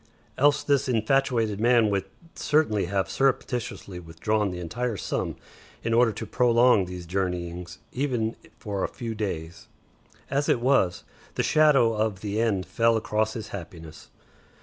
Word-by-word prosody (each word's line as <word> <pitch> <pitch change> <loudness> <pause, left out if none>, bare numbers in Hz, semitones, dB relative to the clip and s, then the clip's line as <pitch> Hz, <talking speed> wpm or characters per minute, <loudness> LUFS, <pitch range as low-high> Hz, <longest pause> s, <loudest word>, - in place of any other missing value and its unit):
Else 145 +2 +3
this 140 -2 +1
infatuated 115 -2 +1
man 115 -2 +4
would 100 -1 0 0.3
certainly 145 - +1
have 95 0 -1
surreptitiously 125 -8 -1
withdrawn 100 +6 -1
the 90 - -5
entire 110 +6 -3
sum - - -3 0.5
in 115 - 0
order 115 0 +4
to - - -6
prolong 120 -4 +4
these 90 -1 -7
journeyings 90 -1 -3
even 125 -4 -1 0.2
for 100 -3 -4
a - - +1
few 115 -2 -5
days. 85 -6 -5 0.6
As 140 +1 0
it - - +3
was, 120 -8 +2 0.3
the - - 0
shadow 140 -7 +4
of 105 -3 -1
the 105 +1 -1
end 100 -5 0
fell 115 +5 +2
across 110 0 0
his 110 - -6
happiness. 80 -4 -9
110 Hz, 145 wpm, -26 LUFS, 95-120 Hz, 0.6 s, man